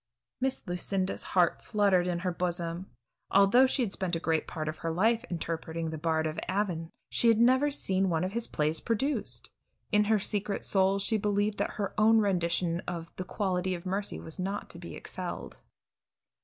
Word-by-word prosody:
'" - - -60
Miss 265 0 0
Lucinda's 185 +2 -1 0.2
heart 175 -2 +4
fluttered 200 -4 +2
in 175 -1 0
her 180 - +2
bosom. 175 0 -1 0.4
Although 200 +7 +6
she 260 0 +1
had 200 -4 -2
spent 185 -3 -1
a - - -1
great 160 -1 0
part 155 -2 -4
of 155 - -4
her 165 - -2
life 220 +8 +2
interpreting 165 -1 -3
the 160 - -4
Bard 160 0 +1
of 155 0 -2
Avon, 185 -4 -1 0.2
she 235 - +2
had 230 -1 +6
never 260 +5 +4
seen 195 -9 +1
one 165 0 +1
of 185 - -1
his 230 +2 -1
plays 155 +1 0
produced. 265 +6 -2 0.4
In 210 -1 +4
her 220 +1 +3
secret 205 0 -2
soul 195 0 +3
she 200 +3 +1
believed 205 0 0
that 200 - -1
her 205 -2 -2
own 220 +1 +6
rendition 175 -4 +1
of 170 -1 -5
"The 185 - -4
quality 185 -2 -1
of 170 - -9
mercy," 195 +2 -2
was 160 +3 -8
not 195 +3 -3
to - - -10
be - - -8
excelled. - - -6
190 Hz, 190 wpm, -30 LUFS, 170-210 Hz, 0.4 s, Although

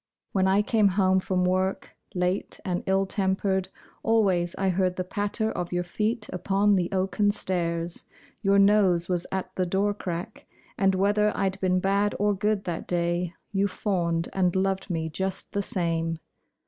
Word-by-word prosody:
When 190 -1 +2
I 195 +2 +3
came 215 -1 +3
home 190 -1 +3
from 185 -1 0
work, 185 +1 -1 0.2
Late 180 +2 -1
and 180 -2 -1
ill 195 0 +2
tempered, 190 -1 0 0.3
Always 190 -6 +2
I 195 0 0
heard 185 0 +1
the 185 - -2
patter 205 +4 -1
of 175 -1 -4
your 175 0 0
feet 210 +5 -2
upon 200 +3 +2
the 175 -2 0
oaken 195 +2 +1
stairs; 170 -4 -1 0.4
Your 200 -2 +3
nose 195 -4 +4
was 175 -2 -1
at 190 -1 -4
the 185 -1 0
door 200 +3 +1
crack; 180 +1 -6 0.3
And 195 -1 +2
whether 205 +2 +2
I'd 195 0 -1
been 185 -1 +2
bad 200 +2 +1
or 205 0 +2
good 210 0 0
that 175 -3 -4
day 175 0 -1 0.2
You 200 0 +1
fawned, 175 -4 -1
and 185 -2 +1
loved 190 +1 0
me 160 -2 -1
just 190 +4 -3
the 200 - 0
same. 165 -3 -1
190 Hz, 165 wpm, -26 LUFS, 180-200 Hz, 0.4 s, nose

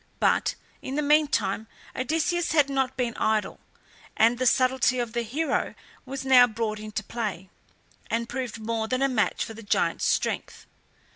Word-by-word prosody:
But - - +2 0.3
in 265 - -5
the 300 - 0
meantime 280 -9 +2 0.3
Odysseus 320 +5 0
had 290 -3 +3
not 265 -1 -1
been 240 -3 -1
idle, 215 -1 0 0.6
and 230 +2 +4
the 255 - +2
subtlety 255 0 +3
of 240 -2 -2
the 240 - 0
hero 275 +8 -1 0.3
was 265 0 -5
now 255 -2 +7
brought 220 -2 -3
into 215 0 -5
play, 205 -4 -5 0.6
and 230 0 -1
proved 245 -3 -4
more 220 0 -2
than 255 +3 0
a - - +4
match 240 -6 0
for 225 - -8
the 225 - -10
giant's 205 - 0
strength. - - -1
245 Hz, 160 wpm, -26 LUFS, 220-265 Hz, 0.6 s, now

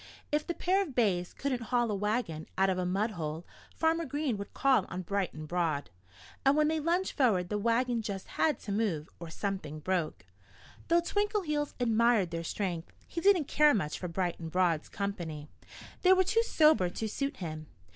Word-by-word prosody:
If 300 0 0
the 345 - -2
pair 380 +3 +2
of 310 -10 -5
bays 185 -7 +1
couldn't 265 -3 -2
haul 240 -1 +1
a - - 0
wagon 205 -6 -2
out 190 0 +3
of 185 - -1
a 180 - -1
mud 200 +5 0
hole 160 -3 -5 0.3
Farmer 325 +1 +2
Green 290 -3 -1
would 200 - -6
call 265 -8 +3
on 185 - -4
Bright 195 0 -1
and 155 0 -8
Broad. 160 - -1 0.5
And 275 +2 +4
when 305 0 +4
they 320 0 0
lunged 345 +5 0
forward 200 - +2
the 210 - -1
wagon 235 +2 +1
just 200 -3 -5
had 310 - +1
to 205 - -5
move 195 -8 -1
or 170 -1 -7
something 165 -5 -4
broke. 160 - -2 0.6
Though 340 +1 +4
Twinkleheels 345 -6 -1
admired 230 -5 +3
their 165 0 -3
strength, 175 -1 -3
he 335 - -5
didn't 385 -5 +4
care 300 -2 +5
much 155 -7 -2
for 180 - -4
Bright 175 0 -2
and 165 -1 -5
Broad's 170 -2 +1
company. 170 -7 -4 0.5
They 370 0 +7
were 375 0 +4
too 425 +5 +2
sober 310 - +4
to 220 +5 -4
suit 275 +5 -3
him. 155 -3 -6
210 Hz, 190 wpm, -31 LUFS, 175-295 Hz, 0.6 s, They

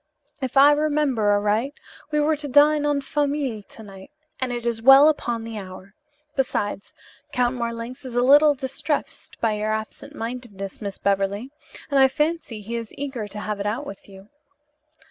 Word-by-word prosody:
"If 260 0 -2
I 280 +2 +8
remember 290 -7 +1
aright, 210 +7 +1 0.3
we 300 -1 0
were 305 +1 +2
to 290 0 -5
dine 295 +2 +4
en 290 -1 +1
famille 280 -5 -1
to 220 +2 -14
night, 195 0 -12 0.3
and 260 -1 -2
it 240 -1 -4
is 230 -1 0
well 270 +4 +8
upon 240 -7 0
the 225 -1 -6
hour. 190 0 -11 0.4
Besides, 205 -7 -2 0.4
Count 250 -1 +1
Marlanx 235 +2 -5
is 255 -2 -7
a 245 - +3
little 290 +3 +6
distressed 275 +3 -4
by 225 -2 +2
your 210 +1 -2
absent 220 0 -5
mindedness, 225 -5 -6
Miss 200 -2 -5
Beverly, 200 +5 -1 0.4
and 280 - +3
I 265 - +7
fancy 300 -5 -2
he 230 +3 -4
is 230 -2 -6
eager 265 -6 -4
to 210 +1 -8
have 210 -1 -4
it 200 - -2
out 240 +8 -2
with 200 -4 -10
you." 195 +1 -14
240 Hz, 175 wpm, -23 LUFS, 210-285 Hz, 0.4 s, I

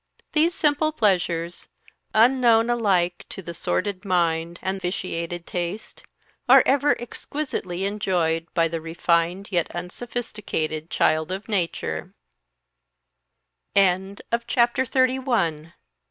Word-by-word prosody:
These 330 +3 +2
simple 305 +1 +2
pleasures, 175 - 0 0.5
unknown 235 0 +5
alike 185 -7 +1
to 190 - -8
the 170 - -6
sordid 190 +3 -2
mind 170 -3 0
and 190 0 -2
vitiated 175 -2 -3
taste, 175 +4 -5 0.5
are - - +9
ever 285 +2 +3
exquisitely 225 - -4
enjoyed 175 -5 0
by 165 -1 +3
the 165 0 -4
refined 170 +4 0
yet 175 -3 +1
unsophisticated 180 -5 -4
child 155 +2 +1
of 195 +2 -5
nature. 190 -6 -2
185 Hz, 90 wpm, -24 LUFS, 170-225 Hz, 0.5 s, are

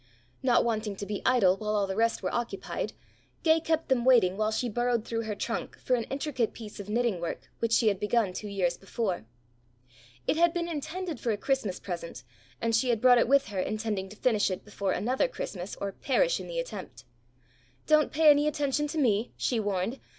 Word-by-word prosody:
Not 245 -2 +3
wanting 215 -3 -1
to 200 - -6
be 205 0 -4
idle 195 -8 +4
while 215 0 -2
all 205 -1 +2
the 190 0 -4
rest 230 +2 +1
were - - -2
occupied, 240 -1 -3 0.5
Gay 320 0 +5
kept 320 0 0
them 260 -3 +2
waiting 235 -8 +5
while 215 +1 +1
she 230 +3 -1
burrowed 240 0 0
through 230 -1 -2
her 215 -1 -3
trunk 225 +3 -4
for 255 - -1
an 235 -2 +1
intricate 270 -4 -2
piece 215 -3 -9
of 200 0 -7
knitting 225 -5 0
work 170 - -5
which 230 -1 0
she 230 0 +4
had 200 -3 +2
begun 210 -2 +1
two 210 - -5
years 185 -4 0
before. 195 - -3 1.0
It - - +1
had 340 +1 +4
been 340 -1 -1
intended 330 0 -4
for 240 - -2
a 215 - +1
Christmas 220 -6 -1
present, 170 -8 -6 0.4
and 230 0 +1
she 250 +3 +2
had 235 -2 +2
brought 245 +1 +6
it - - +3
with 275 -1 +3
her 200 -2 -3
intending 210 -1 -2
to 205 - -11
finish 215 -2 +2
it 185 - -5
before 200 -2 -2
another 250 - +1
Christmas 190 - -6
or 200 - -4
perish - - +1
in - - -7
the - - -5
attempt. - - -7 0.8
"Don't 305 -1 +4
pay 310 0 +6
any 290 +1 +3
attention 295 0 0
to 315 - -5
me," 230 -5 +1
she 240 - 0
warned. 205 +4 -1
230 Hz, 210 wpm, -29 LUFS, 205-270 Hz, 1.0 s, brought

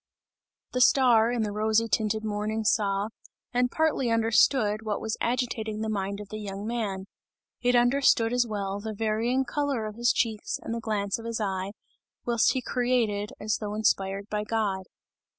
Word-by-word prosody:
The 250 - 0
star, 240 -3 +5
in 240 -2 0
the 210 - -2
rosy 220 +2 +1
tinted 215 +1 0
morning 215 +1 -2
saw, 205 -2 +1 0.4
and 250 0 +2
partly 305 -4 +1
understood 225 -1 +3
what 215 -2 -2
was 220 0 -3
agitating 230 -3 -1
the 220 - -2
mind 200 0 -3
of 205 -1 -9
the 215 - -6
young 200 -1 -6
man; 215 -5 -3 0.6
it 245 0 +3
understood 245 -2 +4
as 245 -1 +2
well, 200 -2 -3
the 215 +1 -5
varying 225 +5 0
colour 280 -6 -1
of 215 0 -7
his 240 +1 +3
checks 220 -2 -1
and - - -4
the 230 - -2
glance 210 -2 -1
of 225 - -9
his 230 -1 -3
eye, 195 -1 -2 0.5
whilst 235 -2 +3
he 260 - -2
created, 235 -5 0
as 210 0 0
though 210 -1 -4
inspired 200 -2 0
by 210 -1 -2
God. 210 -4 -1
220 Hz, 170 wpm, -27 LUFS, 205-240 Hz, 0.6 s, star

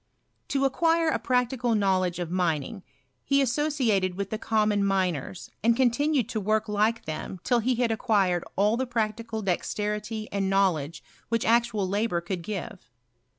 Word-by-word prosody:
To 275 -1 +1
acquire 330 +4 +2
a - - 0
practical 250 -2 +1
knowledge 185 -4 +1
of 175 -2 -4
raining 175 +1 -1 0.4
he 275 0 +2
asso 275 +3 +1
ciated 215 -11 +1
with 195 0 -4
the 220 - -3
common 210 -2 +1
miners, 185 -4 -1
and 230 +1 +4
continued 260 0 +2
to 225 - -2
work 215 +2 0
like 215 +2 0
them 155 +4 -5
till 245 - +2
he 250 +2 +1
had 235 -1 +1
acquired 200 -6 +1
all 210 +4 +2
the 260 0 -1
practical 225 -1 -2
dexterity 210 +3 -2
and 195 -1 -1
knowledge 175 -6 +1 0.3
which 230 -1 0
actual 230 -4 +2
labour 200 -2 0
could 175 +1 -4
give. 190 - -6
215 Hz, 155 wpm, -26 LUFS, 190-235 Hz, 0.4 s, and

